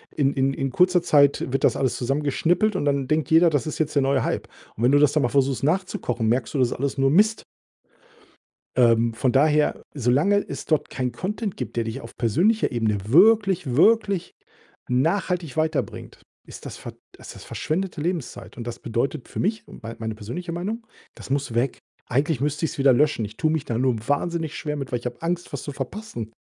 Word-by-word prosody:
in 140 -2 +2
in 135 0 +1
in 135 0 -2
kurzer 180 +5 +3
Zeit 140 -3 +3
wird 135 - 0
das - - +3
alles 130 -3 0
zusammengeschnippelt 150 - +1
und 185 - -1
dann 140 -2 0
denkt 155 -1 0
jeder, 165 +1 +6
das 145 -1 0
ist 155 - -5
jetzt 155 -1 -1
der 140 - +4
neue 135 0 +1
Hype. - - -2 0.3
Und 115 - -4
wenn 125 - +5
du 145 - +5
das 145 -1 +4
dann 155 - +2
mal 120 - +1
versuchst 135 -3 +1
nachzukochen, 150 - -1
merkst 120 +2 0
du, 145 - -1
das 125 -2 +3
ist - - -2
alles 140 +2 -2
nur 135 0 +3
Mist. 215 +6 +3 1.3
Ähm, 115 -2 +4
von 125 +2 0
daher, 150 +3 +2
solange 145 - +2
es - - -6
dort 155 -3 0
kein 125 -1 -2
Content 205 +1 -4
gibt, 125 - -6
der 115 - 0
dich 115 +4 -5
auf - - -12
persönlicher 175 - +2
Ebene 110 -3 0
wirklich, 190 - +4
wirklich 205 0 +3 0.5
nachhaltig 165 +4 0
weiterbringt, 155 -1 -2 0.2
ist - - -11
das - - -7
ver - - -8 0.3
ist - - -11
das - - -12
verschwendete 175 +1 -3
Lebenszeit. 170 -3 -4
Und 120 - -7
das 120 - -5
bedeutet 120 +4 -3
für - - -5
mich, 215 +3 -1
mein 115 +1 -9
meine 110 -1 -4
persönliche 170 - -6
Meinung: 215 +7 -4 0.3
Das - - -12
muss 140 -3 -1
weg. 120 +3 0 0.3
Eigentlich 140 +2 0
müsste 150 +3 -1
ich's 155 - -3
wieder 135 -2 +5
löschen. 145 -4 +2
Ich 105 +2 -13
tue 155 - +1
mich 155 -2 -1
da 115 - -2
nur 125 0 +1
wahnsinnig 160 +2 -1
schwer 150 -1 -3
mit, 135 -2 -5
weil 120 - +1
ich 120 - -16
habe 125 - -5
Angst, 175 +1 -3
was - - -5
zu 145 - -6
verpassen. 135 - -6
145 Hz, 205 wpm, -24 LUFS, 125-170 Hz, 1.3 s, jeder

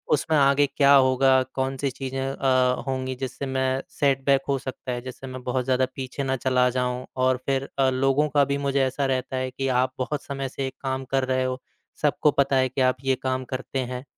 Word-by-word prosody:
उसमें 160 +2 -1
आगे 140 0 +4
क्या 140 0 +4
होगा? 130 0 +4 0.2
कौन-सी 135 +1 -1
चीज़ें 135 +1 -5
अ, 130 -2 +1
होंगी 130 -1 -2
जिससे 130 +2 -5
मैं 130 0 0
सेट 135 -2 +1
बैक 140 -1 +4
हो 140 - +2
सकता 130 0 -6
है, 120 0 -3
जिससे 130 +1 -9
मैं 130 0 -7
बहुत 125 0 -1
ज़्यादा 130 0 +2
पीछे 135 +1 -4
ना 130 0 0
चला 125 -1 +3
जाऊँ 125 0 -2 0.2
और 130 0 +3
फ़िर 135 0 -1
अ, 135 -1 +4
लोगों 135 +3 +2
का 145 0 +3
भी 140 - +1
मुझे 140 0 +1
ऐसा 135 +2 -1
रहता 130 0 -2
है 130 0 -2
कि 135 +1 -3
आप 130 0 -1
बहुत 135 +3 -3
समय 135 -1 -4
से 135 +1 -4
एक 130 - -6
काम 130 0 -2
कर 135 -1 +3
रहे 130 0 +1
हो। 130 0 -2 0.4
सबको 150 0 +3
पता 140 -1 +2
है 130 0 +3
कि 130 +1 -2
आप 130 0 +3
ये 135 0 +2
काम 130 0 -1
करते 130 +1 -3
हैं 125 0 -5
130 Hz, 220 wpm, -25 LUFS, 130-135 Hz, 0.4 s, आगे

